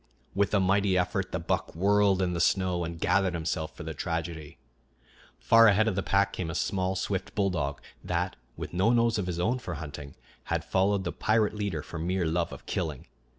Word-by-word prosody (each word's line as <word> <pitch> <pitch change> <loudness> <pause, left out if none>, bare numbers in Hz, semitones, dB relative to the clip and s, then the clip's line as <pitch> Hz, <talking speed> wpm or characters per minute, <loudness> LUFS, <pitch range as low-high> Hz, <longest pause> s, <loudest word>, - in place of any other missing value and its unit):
With 100 0 +1
a - - +4
mighty 95 0 +2
effort 90 +1 -1
the - - -1
buck 85 -1 -2
whirled 100 +1 +3
in 90 -1 0
the 85 - -2
snow 90 0 +2
and 85 0 -5
gathered 95 -1 +2
himself 80 -1 -3
for - - -7
the - - -5
tragedy. 80 -4 -4 0.8
Far 115 - +6
ahead 105 +1 +4
of 110 - +1
the 95 - -1
pack 100 +2 +1
came 85 -3 -3
a 80 - -4
small, 95 +1 0
swift 95 0 -3
bulldog 85 -9 0 0.2
that, - - -1 0.2
with - - -6
no 95 +5 +3
nose 115 -2 +3
of 95 - -2
his 85 -1 -3
own 120 +8 +1
for 85 -7 -5
hunting, 75 -2 -8 0.3
had 85 -1 -2
followed 95 +3 +1
the 85 - -2
pirate 110 -1 +1
leader 100 -7 -3
for 80 - -7
mere 90 +2 0
love 85 +1 0
of - - -10
killing. 80 -7 -3
90 Hz, 200 wpm, -28 LUFS, 85-100 Hz, 0.8 s, Far